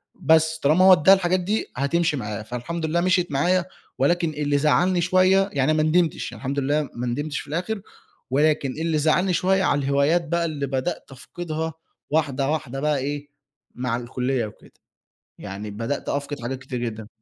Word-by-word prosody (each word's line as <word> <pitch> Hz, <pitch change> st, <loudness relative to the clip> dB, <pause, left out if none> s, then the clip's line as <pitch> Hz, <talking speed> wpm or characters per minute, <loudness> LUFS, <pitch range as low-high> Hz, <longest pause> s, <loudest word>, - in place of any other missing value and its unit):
بس 160 Hz, 0 st, +3 dB
طالما 155 Hz, +6 st, +4 dB
هو 190 Hz, -, +9 dB
ادّاها 180 Hz, +3 st, +6 dB
الحاجات 185 Hz, -1 st, +1 dB
دي 205 Hz, +5 st, -1 dB
هتمشي 150 Hz, +3 st, +1 dB
معاه، 105 Hz, -3 st, -4 dB
فالحمد 125 Hz, +9 st, -4 dB
لله 165 Hz, +2 st, +1 dB
مشيت 180 Hz, -1 st, +1 dB
معايا 175 Hz, +6 st, +2 dB, 0.3 s
ولكن 170 Hz, +5 st, +2 dB
اللي 145 Hz, -1 st, 0 dB
زعّلني 175 Hz, +5 st, +2 dB
شوية، 185 Hz, +2 st, +3 dB
يعني 140 Hz, +2 st, +2 dB
ما 155 Hz, 0 st, +2 dB
ندمتش، 160 Hz, +1 st, +1 dB
يعني -, -, -10 dB
الحمد 135 Hz, +1 st, -2 dB
لله 145 Hz, +1 st, 0 dB
ما 120 Hz, +1 st, -4 dB
ندمتش 145 Hz, +5 st, -2 dB
في -, -, -9 dB
الآخر، 180 Hz, +8 st, -3 dB, 0.5 s
ولكن 145 Hz, -1 st, +2 dB
اللي 160 Hz, +2 st, -1 dB
زعّلني 170 Hz, +5 st, +2 dB
شوية 190 Hz, +3 st, +2 dB
على 145 Hz, -, +2 dB
الهوايات 140 Hz, +5 st, +2 dB
بقى 170 Hz, +2 st, 0 dB
اللي 145 Hz, -4 st, -3 dB
بدأت 135 Hz, +4 st, -3 dB
أفقدها 160 Hz, +4 st, -5 dB, 0.4 s
واحدة، 145 Hz, -3 st, 0 dB
واحدة 135 Hz, -4 st, -3 dB
بقى 150 Hz, 0 st, +1 dB
إيه 145 Hz, +2 st, -4 dB, 0.5 s
مع 125 Hz, -2 st, -2 dB
الكلية 125 Hz, 0 st, -2 dB
وكده، 105 Hz, -, -13 dB, 0.7 s
يعني 100 Hz, +2 st, -7 dB
بدأت 115 Hz, +7 st, -4 dB
أفقد 140 Hz, -1 st, -3 dB
حاجات 125 Hz, +2 st, -4 dB
كتير 130 Hz, -1 st, -5 dB
جدًا. 110 Hz, -3 st, -5 dB
150 Hz, 170 wpm, -23 LUFS, 135-170 Hz, 0.7 s, هو